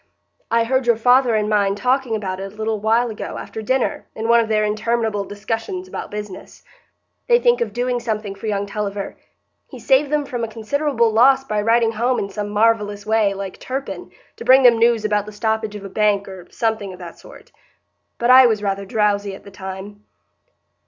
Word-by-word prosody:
I 230 0 +2
heard 260 +2 0
your 235 - +5
father 245 +1 +3
and 210 -1 0
mine 200 -2 +1
talking 250 +2 0
about 190 -3 -4
it 195 0 -6
a - - -18
little 220 0 -2
while 225 +3 +1
ago, 215 - -6
after 220 - -7
dinner, 260 +4 -1
in 220 +1 -3
one 235 0 +5
of 230 - 0
their 215 -1 +2
interminable 215 0 -1
discussions 225 - -5
about - - -6
business. 210 -2 -8 0.6
They 480 -1 +5
think 480 0 +2
of 470 - -1
doing 245 0 -1
something 215 -4 -3
for 200 +3 -8
young 200 -1 -1
Tulliver; 200 -1 -4 0.5
he - - -11
saved 270 +1 +2
them 300 -1 0
from 245 -3 -4
a - - -1
considerable 235 +2 0
loss 265 +4 +5
by 215 -5 -2
riding 225 +1 +3
home 240 +3 0
in 200 - -3
some 205 0 -4
marvellous 210 -1 +1
way, 215 -2 +2
like 195 -1 -7
Turpin, 265 +2 -5 0.3
to - - -8
bring 260 +2 +6
them 235 -2 +6
news 230 -2 +3
about 210 -1 0
the - - -7
stoppage 220 0 -2
of 200 -1 -8
a - - -4
bank, 205 0 +1
or 185 -2 -10
something 220 -4 -2
of - - -11
that 175 -2 -10
sort. - - -15 0.7
But 240 +1 +2
I 255 0 +9
was 215 -3 -1
rather 195 -1 -2
drowsy 205 -2 0
at - - -14
the 200 - -13
time." 190 +2 -8
220 Hz, 200 wpm, -20 LUFS, 205-240 Hz, 0.7 s, I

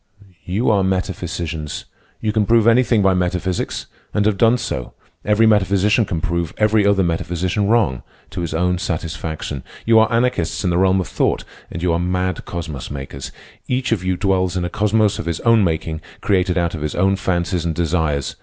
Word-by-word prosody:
"You 100 +7 +1
are 100 -2 +3
metaphysicians. 85 -5 -3 0.4
You 110 - 0
can 105 -2 +1
prove 115 -1 +4
anything 115 -2 +4
by 95 -1 +4
metaphysics; 90 0 -1 0.3
and 105 - +2
having 105 -1 +2
done 115 +3 +4
so, 65 - -5 0.3
every 105 +2 +3
metaphysician 105 +1 +3
can 85 -4 -3
prove 85 -1 -2
every 105 -1 +3
other 100 -1 +3
metaphysician 90 +3 -1
wrong—to 95 - -1
his 85 - -3
own 90 +1 +1
satisfaction. 80 -5 -4 0.2
You 115 -1 +6
are 110 - +3
anarchists 115 -7 0
in 90 - +1
the 85 - +1
realm 95 0 +3
of 90 - -5
thought. - - 0 0.3
And 85 - -6
you 90 -2 +2
are 85 - +1
mad 90 0 -1
cosmos 80 -6 -5
makers. 70 -1 -7 0.4
Each 125 -1 -1
of 105 -5 0
you 90 -1 0
dwells 95 -1 +1
in 90 - -1
a - - -2
cosmos 105 0 +2
of - - -5
his 85 -1 -2
own 115 -2 +4
making, 80 -2 -2 0.2
created 90 -2 +1
out 85 -1 0
of 80 - -5
his 75 0 -3
own 95 +2 +2
fancies 90 -2 -1
and 85 -2 -2
desires. 80 -5 0
90 Hz, 185 wpm, -20 LUFS, 85-105 Hz, 0.4 s, You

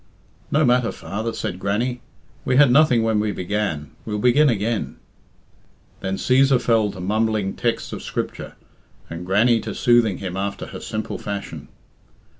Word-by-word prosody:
"No 155 +1 +3
matter, 125 -1 +2
father," 110 +3 -4
said 90 -5 -4
Grannie. 120 +6 -1 0.4
"We 125 - +1
had 145 -3 +6
nothing 125 -4 +5
when 110 -1 +1
we 105 0 0
began; 95 -6 -3
we'll 105 -1 -3
begin 125 +7 +4
again." 110 0 -1 1.0
Then 95 0 -2
Cæsar 130 +3 +3
fell 115 -3 +2
to 95 - -10
mumbling 105 +1 0
texts 120 -2 -2
of - - -5
Scripture, - - -5 0.6
and 85 +2 -6
Grannie 115 +5 +3
to 110 -1 -6
soothing 120 -5 +3
him 95 -2 -5
after 100 +1 -3
her - - -8
simple 110 0 -5
fashion. 100 -1 -6
110 Hz, 150 wpm, -22 LUFS, 100-120 Hz, 1.0 s, had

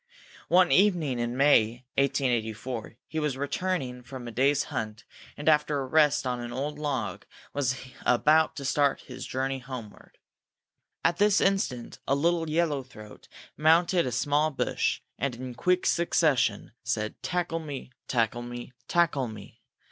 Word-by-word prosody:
One 180 0 +5
evening 175 -10 +3
in 120 +1 -2
May, 120 -4 +4
1884, 120 -4 -1
he 160 - -3
was 150 -4 -1
returning 145 -3 -2
from 125 0 -8
a - - -5
day's 135 +4 +2
hunt, 110 0 -4 0.3
and, 145 - -7
after 150 -2 +3
a 135 - -2
rest 150 0 +3
on 125 -1 -1
an 120 0 -6
old 145 +4 -3
log, 130 -10 -2
he - - -24 0.3
was 130 -2 0 0.3
about 155 +6 +4
to 140 - -6
start 140 +1 +2
on - - -20
his 125 0 -8
journey 135 +1 -2
homeward. 125 -5 -10 0.9
At 170 - +3
this 205 0 +4
instant 195 -12 0
a 140 - +3
little 165 +2 +1
yellow 155 -3 +1
throat 110 -5 -13 0.3
mounted 170 +1 +4
a - - -2
small 145 +5 +2
bush 145 - -1 0.2
and, 135 -2 -1
in 125 +1 -7
quick 180 +9 +1
succession, 150 -10 +2
said: 110 0 -2
_Tackle 165 -1 -2
me! 140 -4 -7 0.2
tackle 120 -1 0
me! 120 +1 -7
tackle 150 -7 +2
me! 110 -3 -11
135 Hz, 155 wpm, -28 LUFS, 120-155 Hz, 0.9 s, One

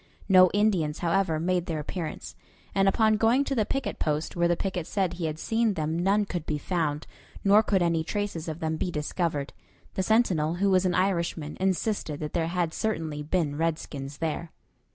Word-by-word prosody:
No 185 -2 +7
Indians, 190 -8 +1
however, 170 -2 +1
made 180 +1 0
their 160 - -2
appearance, 160 +2 -5 0.4
and 195 0 +3
upon 215 +1 +3
going 230 +5 +3
to 275 - -2
the 220 -5 +1
picket 270 -2 -2
post 155 0 -1
where 170 0 +2
the 175 - +2
picket 185 -4 -3
said 190 -4 0
he 175 - -4
had 155 0 -4
seen 225 +3 +1
them 160 +1 -1
none 200 +3 +2
could 175 -5 -5
be 150 - 0
found, 150 -2 -1 0.4
nor 205 +2 +6
could 195 -4 +1
any 165 -2 +1
traces 200 -3 -3
of 160 0 -5
them 160 0 -1
be 180 - -1
discovered. 150 -2 -2 0.4
The - - -1
sentinel, 185 -7 +2
who 195 +2 +2
was 185 0 +4
an 175 - 0
Irishman, 170 -5 0
insisted 190 -4 -1
that 150 -1 -5
there 165 -2 0
had 170 -1 -1
certainly 160 -9 -2
been 150 -2 -1
redskins 145 -4 -3
there. 165 +1 -3
175 Hz, 190 wpm, -27 LUFS, 155-195 Hz, 0.4 s, No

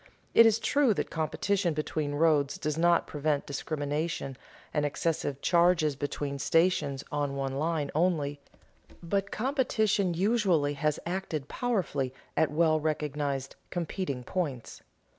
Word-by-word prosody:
It 230 - +8
is 220 -1 +4
true 265 -1 +2
that - - -3
competition 170 +2 0
between 150 -1 -2
roads 150 -3 +2
does 150 -1 -2
not 170 +1 +3
prevent 150 -1 -1
discrimination 145 0 -3 0.4
and 150 - +1
excessive 145 -1 -1
charges 170 -3 +3
between 145 0 -3
stations 145 -2 +2
on 145 -1 -1
one 135 -1 -2
line 155 -2 -1
only; 150 -4 +1 0.6
but 195 +3 -1
competition 220 - +1
usually 185 -7 +2
has 150 +1 0
acted 170 -5 -3
powerfully 165 - -1 0.2
at 160 - +3
well 155 0 +3
recognized 145 -3 -2
"competing 170 -6 -3
points." 140 -6 -4
155 Hz, 125 wpm, -29 LUFS, 145-180 Hz, 0.6 s, It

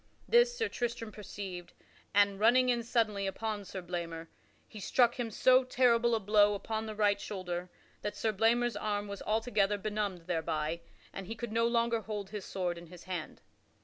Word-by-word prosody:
This 480 0 +4
Sir 450 - +1
Tristram 235 -2 -3
perceived, 195 -4 -7 0.4
and, 200 -1 +3
running 250 +4 +5
in 240 -1 +2
suddenly 220 -4 0
upon 210 +1 -3
Sir 190 -1 -6
Blamor, 170 -2 -5 0.4
he 215 - -10
struck 240 +4 +2
him 235 -2 -1
so 255 +4 +5
terrible 240 -2 +3
a - - 0
blow 205 0 +4
upon 220 +2 -3
the 215 - -5
right 205 -1 +2
shoulder 180 -3 -4 0.3
that 210 0 -3
Sir 220 0 0
Blamor's 235 +3 +2
arm 205 0 -2
was 200 -1 -6
altogether 215 -2 +1
benumbed 205 -4 -3
thereby, 165 -1 -1 0.3
and 195 -2 -6
he 225 - -5
could 235 -1 -5
no 230 +1 +2
longer 235 -1 +1
hold 205 -2 -5
his 210 -3 -5
sword 175 -2 -2
in 170 - -12
his 175 +1 -12
hand. 180 -4 -6
210 Hz, 180 wpm, -32 LUFS, 190-230 Hz, 0.4 s, running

